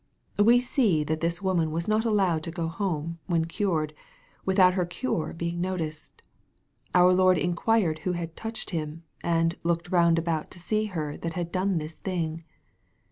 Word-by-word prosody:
We 235 +4 +6
see 230 - +2
that 155 +1 -2
this 170 +3 -1
woman 175 -4 +1
was 165 +2 -2
not 215 +1 +2
allowed 195 -7 +2
to 165 - -4
go 165 -1 -2
home, 165 -2 -3
when 165 -2 +1
cured, 165 -4 -1 0.5
without 190 -1 +5
her 185 -1 +1
cure 175 -2 -2
being 170 +1 -3
noticed. 165 -4 -4 0.7
Our 180 0 +7
Lord 185 0 +5
inquired 175 0 +1
who 180 - -1
had 170 -2 -5
touched 225 -1 -5
Him, 160 -1 -4 0.2
and 165 0 +2
" - - -39
looked 170 +1 -1
round 170 -2 +4
about 165 -2 -1
to 175 - -12
see 215 +5 0
her 155 -8 -4
that 165 -1 -4
had 170 -1 -3
done 190 0 +1
this 155 0 -5
thing." 165 -3 -3
170 Hz, 175 wpm, -27 LUFS, 165-190 Hz, 0.7 s, Our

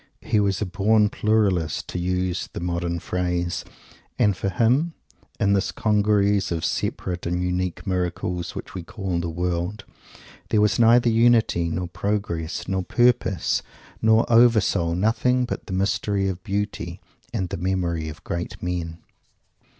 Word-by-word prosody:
He 105 - +1
was 100 0 +1
a - - -1
born 105 +3 +3
"Pluralist" 100 -7 +1
to 90 - -3
use 90 0 -1
the - - -4
modern 85 0 -2
phrase; 90 0 -2 0.5
and 105 -2 +3
for 100 - -2
him, 130 - +2 0.5
in 100 -3 +3
this 100 0 +1
congeries 105 -2 +2
of 80 -1 -1
separate 90 -1 -2
and 90 +1 -1
unique 90 0 -2
miracles, 90 -2 -2
which - - -7
we 95 - -5
call 95 0 -3
the 85 0 -2
World, 90 +4 -2 0.7
there 110 - +3
was 105 +1 +3
neither 120 +1 +5
Unity, 115 -7 +3
nor 90 +2 -2
Progress, 90 -3 -3
nor 95 -1 0
Purpose, 120 -3 +2 0.4
nor 110 +1 +4
Over 115 -1 +6
soul 85 -4 0
nothing 120 +6 +2
but 120 - -5
the 95 - -5
mystery 100 +1 0
of 95 -2 -4
Beauty, 100 -4 -3 0.3
and 95 -6 -2
the 95 - -4
Memory 85 -3 -1
of 75 - -11
great 85 +1 -4
men! 85 -2 -3
95 Hz, 150 wpm, -24 LUFS, 85-105 Hz, 0.7 s, Over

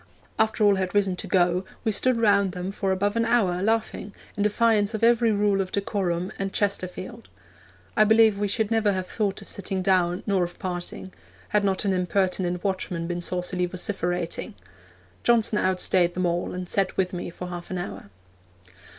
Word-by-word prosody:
After 220 0 +2
all 205 -1 +5
had 185 0 -2
risen 195 -2 +2
to - - -6
go 180 -1 +2 0.2
we 220 - +1
stood 250 +4 +2
round 200 -4 +3
them 180 +1 -4
for 195 -1 -1
above 200 +3 0
an 230 - +2
hour, 215 -7 +2
laughing, 220 -1 -1 0.2
in 205 - -3
defiance 210 0 +2
of 220 - -4
every 235 -1 +4
rule 205 -1 +2
of 185 -1 -5
decorum 190 -3 -1
and 195 0 -2
Chesterfield. 185 - -3 0.7
I 215 - +6
believe 220 -1 +5
we 205 - +1
should 220 +2 -1
never 220 -3 +2
have 185 -1 -2
thought 200 0 -2
of - - -17
sitting 190 -1 -3
down, 180 -2 +2
nor 195 -3 +2
of 175 0 -5
parting, 180 +1 -5 0.4
had 210 -1 +2
not 195 +1 0
an 195 - +2
impertinent 180 -1 0
watchman 185 -3 -2
been 175 0 -3
saucily 180 +1 -1
vociferating. 175 -2 -3 0.7
Johnson 225 -3 +3
outstaid 180 -1 +1
them 185 0 0
all, 175 0 -1
and 180 0 -5
sat 195 +1 0
with 185 -1 0
me 175 -1 -4
for 180 +1 -7
half 175 -1 -7
an 185 - -3
hour.' 175 - -6
190 Hz, 180 wpm, -25 LUFS, 180-210 Hz, 0.7 s, I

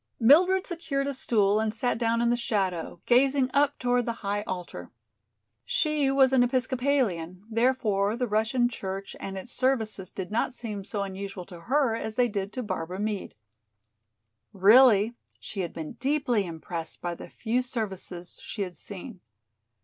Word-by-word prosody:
Mildred 360 +10 +5
secured 310 -6 -2
a 280 - -2
stool 210 -5 +2
and 220 0 0
sat 230 0 0
down 230 0 +1
in 235 - +3
the - - +3
shadow, 190 -8 -2
gazing 260 +1 +3
up 285 0 +3
toward 245 -1 +1
the 230 -1 -4
high 205 +1 0
altar. 175 - -6 0.7
She 300 - +1
was 270 -1 +4
an 260 - +5
Episcopalian, 245 -8 0
therefore 225 -3 +1
the 250 - 0
Russian 225 +3 +2
church 195 -4 -6
and 195 0 -5
its 190 +6 -7
services 220 -7 0
did 190 0 -6
not 235 +3 0
seem 215 -5 -4
so 205 0 -3
unusual 195 -1 -6
to 175 -2 -11
her 270 -4 +3
as 220 -1 -4
they 245 0 +3
did 200 -3 -3
to 255 - -3
Barbara 180 -3 -4
Meade. 210 -1 -3 1.2
Really 215 +2 +6 0.3
she 200 - -8
had 175 -3 -2
been 160 -2 -6
deeply 255 -7 0
impressed 165 0 -6
by 175 -1 -3
the - - -10
few 240 +2 -1
services 195 -7 -5
she 205 - -4
had 180 -2 -7
seen. 200 +1 -8
225 Hz, 160 wpm, -27 LUFS, 195-255 Hz, 1.2 s, Really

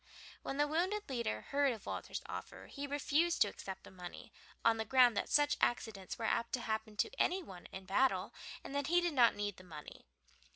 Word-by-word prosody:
When 270 - -4
the 290 - +4
wounded 370 +7 0
leader 235 - -1
heard 280 -1 +3
of 220 - -10
Walter's - - -4
offer - - -7
he 285 0 -6
refused 295 +4 +2
to - - -2
accept 190 -1 -7
the - - -12
money 180 -1 -9 0.3
on 230 0 +5
the 220 - 0
ground 245 +1 +5
that - - -1
such 290 0 +4
accidents 205 -6 0
were 230 - -3
apt 230 +1 0
to 250 - 0
happen 220 -1 -3
to - - +1
any 370 +1 +2
one 180 - -10
in 190 0 -9
battle, 255 +8 +2 0.3
and - - -7
that 285 -1 0
he 350 +2 +5
did 345 -2 0
not 240 -4 +5
need 205 -1 -3
the 185 - -12
money. 155 -4 -11
240 Hz, 210 wpm, -36 LUFS, 205-290 Hz, 0.3 s, on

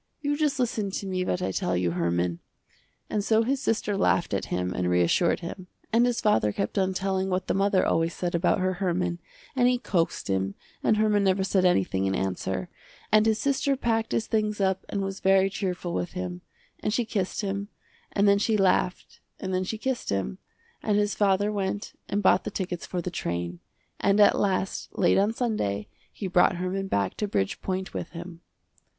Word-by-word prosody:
You 290 -1 0
just 300 -2 +1
listen 230 -5 0
to 195 - -4
me 185 -1 -1
what 90 - -1
I 95 - 0
tell 90 -1 0
you 90 -1 +1
Herman." 85 0 0 0.7
And 210 - -1
so 220 +2 +3
his 265 +3 0
sister 215 -4 0
laughed 180 - +2
at 100 - -1
him 90 0 -2
and 90 -1 -1
reassured 90 - +2
him, 180 +2 -7 0.3
and 235 +2 +5
his 245 -1 0
father 110 - +3
kept 195 - -2
on 190 0 +1
telling 190 0 0
what 185 0 -1
the - - 0
mother 195 -1 +2
always 165 +1 +1
said 175 -1 -2
about 170 +1 +2
her 185 0 +1
Herman, 180 -1 0 0.4
and 245 -2 +4
he 250 0 +3
coaxed 175 -8 -1
him 95 0 -1 0.3
and 215 - +3
Herman 210 -1 +3
never 190 0 +2
said 190 -1 +2
anything 95 - +2
in 95 - 0
answer, 95 - -2 0.4
and 215 +1 +5
his 220 -1 +3
sister 275 +1 +1
packed 225 -3 0
his 225 - 0
things 215 -1 0
up 190 -1 0
and 200 -1 -1
was 195 0 -4
very 195 0 +4
cheerful 180 -3 -3
with 175 - -2
him, 180 -1 -4 0.4
and - - -1
she 235 +2 +1
kissed 195 -2 -2
him, 200 0 -3 0.4
and 200 0 +2
then 200 0 +5
she 215 +1 +2
laughed 185 -2 +1 0.2
and 190 -1 -3
then 185 0 +1
she 220 +4 -3
kissed 260 +2 -2
him, 95 -11 -2 0.4
and 210 -1 +1
his 205 0 +1
father 205 0 +2
went 200 0 -3 0.2
and 205 +1 0
bought 190 - +5
the - - -3
tickets 180 -3 -4
for 180 -2 -3
the 180 - -3
train, 85 - -3 0.4
and 200 +1 +3
at 205 - +7
last 190 -1 -1
late - - +4
on 205 +2 +3
Sunday 210 - -1 0.2
he 205 - -7
brought 180 0 +4
Herman 185 +2 -2
back 100 - 0
to 210 - -1
Bridgepoint 185 - -2
with - - -4
him. 170 0 -8
190 Hz, 200 wpm, -27 LUFS, 170-210 Hz, 0.7 s, at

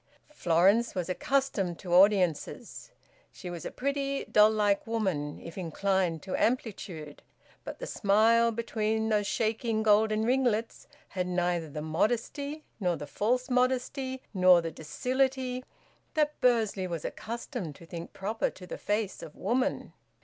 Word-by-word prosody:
Florence 195 - +3
was 180 -1 -2
accustomed 200 -5 0
to 175 -2 -5
audiences. 185 -4 +2 0.4
She 180 - -8
was 170 -2 -7
a - - -2
pretty, 275 0 -2
doll 210 0 +6
like 210 -2 +1
woman, 190 -11 -2
if 170 +3 -9
inclined 180 -1 0
to 190 - -3
amplitude; 190 - -2 0.4
but - - -7
the - - -6
smile 230 - +3
between 220 -1 -1
those 210 -2 +1
shaking 225 0 0
golden 215 0 +3
ringlets 240 -2 0 0.2
had 180 -1 -2
neither 175 -2 0
the 150 +1 -5
modesty 240 - -1 0.2
nor 180 -4 +1
the 150 - -6
false 250 +10 0
modesty 260 +1 0
nor 185 -2 +6
the 165 -1 -4
docility 255 - -1 0.5
that 300 -1 0
Bursley 220 -6 +2
was 170 -3 -5
accustomed 230 - -5
to 170 - -14
think 170 0 -8
proper 210 +4 -2
to 185 - -12
the - - -7
face 205 -1 -2
of 150 - -10
woman. 260 +3 -1
215 Hz, 140 wpm, -29 LUFS, 180-245 Hz, 0.5 s, doll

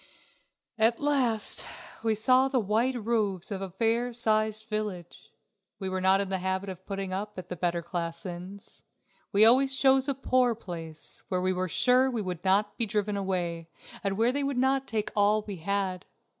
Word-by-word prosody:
At 225 +1 +3
last 260 -7 +1 0.4
we 225 -1 +1
saw 255 +5 +4
the 265 -1 +1
white 225 +5 +1
roofs 210 -5 -1
of 195 -1 -3
a 195 - -4
fair 230 +5 0
sized 220 -2 +1
village. 210 -6 -5 0.5
We 190 -2 -4
were 185 0 -2
not 190 +1 +4
in 200 -1 -2
the 190 -1 -1
habit 190 +1 -2
of 185 0 -9
putting 195 -2 -4
up 205 +2 -4
at 185 0 -7
the 180 - -4
better 170 0 -1
class 170 -1 -4
inns. 185 +3 -7 0.5
We 205 +2 +6
always 265 +3 +5
chose 265 0 +4
a 275 - 0
poor 255 -2 +2
place, 165 -7 -6
where 185 - 0
we 185 +1 +1
were 185 0 -2
sure 255 +7 +4
we 235 -4 -2
should 180 -3 -5
not 200 +2 +2
be 230 - +2
driven 210 0 -1
away, 175 -4 -2 0.3
and 195 -1 -1
where 230 +3 +3
they 285 +2 -1
would 275 -2 -1
not 265 +1 +2
take 215 -2 -1
all 210 +1 +3
we 205 -3 -6
had. 190 +1 -2
205 Hz, 185 wpm, -28 LUFS, 185-235 Hz, 0.5 s, We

